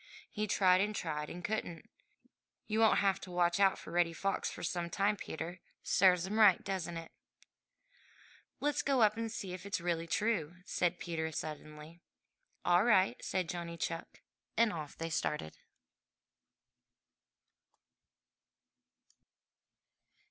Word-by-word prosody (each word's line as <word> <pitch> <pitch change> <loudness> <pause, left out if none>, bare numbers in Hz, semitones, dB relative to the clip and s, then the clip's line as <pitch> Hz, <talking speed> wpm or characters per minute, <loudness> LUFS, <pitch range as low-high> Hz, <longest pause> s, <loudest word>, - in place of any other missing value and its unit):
He 215 0 -2
tried 185 -2 +4
and 210 +1 -1
tried 150 -4 -3
and 175 +1 -8
couldn't. 190 -6 -3 0.8
You 215 0 -1
won't 220 -1 +5
have 195 -1 +2
to - - -9
watch 175 0 +1
out 195 -1 +4
for - - -10
Reddy 170 -1 +2
Fox 195 +4 -1
for - - -8
some 175 -1 -2
time, 200 +3 +1
Peter. 175 -2 -6 0.2
Serves 180 -2 +4
him 210 +3 -2
right, 205 -4 +6
doesn't 175 -3 -3
it?'' 165 0 -8 1.5
"Let's 290 -1 +1
go 270 -4 +3
up 215 0 +4
and 225 0 -3
see 195 -5 -5
if 180 -1 -7
it 200 -1 -2
really 170 -1 -1
is 165 - -16
true!" 195 -7 0
said 175 0 0
Peter 160 -2 -3
suddenly. 155 +2 -7 0.6
"All 175 +2 +5
right," 190 - +3
said 185 -2 -1
Johnny 170 0 -5
Chuck, 165 0 -5 0.4
and 225 -2 +4
off 155 -3 -6
they 165 0 -4
started. 150 - -2
180 Hz, 135 wpm, -33 LUFS, 165-200 Hz, 1.5 s, right